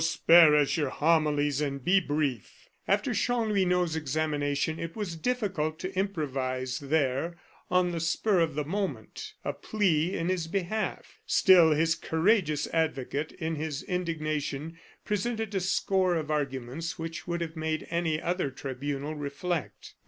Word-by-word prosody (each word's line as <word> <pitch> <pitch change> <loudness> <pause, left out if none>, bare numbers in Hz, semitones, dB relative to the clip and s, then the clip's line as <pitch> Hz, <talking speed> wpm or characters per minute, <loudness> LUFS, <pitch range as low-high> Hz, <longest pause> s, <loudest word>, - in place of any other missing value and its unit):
spare 165 -1 +6
us 150 +2 +2
your 145 -4 0
homilies, 150 -2 +2
and 140 -2 -2
be 195 +2 +5
brief." 145 - -3 0.2
After - - +1
Chanlouineau's 190 -8 +1
examination, 150 0 -1
it 165 0 -5
was 205 -6 -4
difficult 185 -7 -1
to 185 +3 -6
improvise 135 -9 -2
there, 145 +3 0 0.3
on 180 -1 +2
the 170 - -3
spur 180 +4 +1
of 165 -3 +1
the 150 -1 -1
moment, 205 - -4
a - - -1
plea 185 -4 0
in 165 - -2
his 180 -3 -1
behalf. 195 +4 -3
Still, 180 -4 +6
his 165 +2 +2
courageous 160 -2 +1
advocate, 155 -2 -1
in 160 -2 -3
his 155 +1 -3
indignation, 155 -3 -3 0.3
presented 220 +1 -2
a 195 - +1
score 190 -1 +1
of 155 -2 -2
arguments 140 +2 -3
which 165 +1 -6
would 170 0 -2
have 165 -1 -4
made 160 0 -2
any 165 -2 0
other 175 -3 -1
tribunal 140 +2 -4
reflect. 150 +2 -4
160 Hz, 140 wpm, -28 LUFS, 145-180 Hz, 0.3 s, spare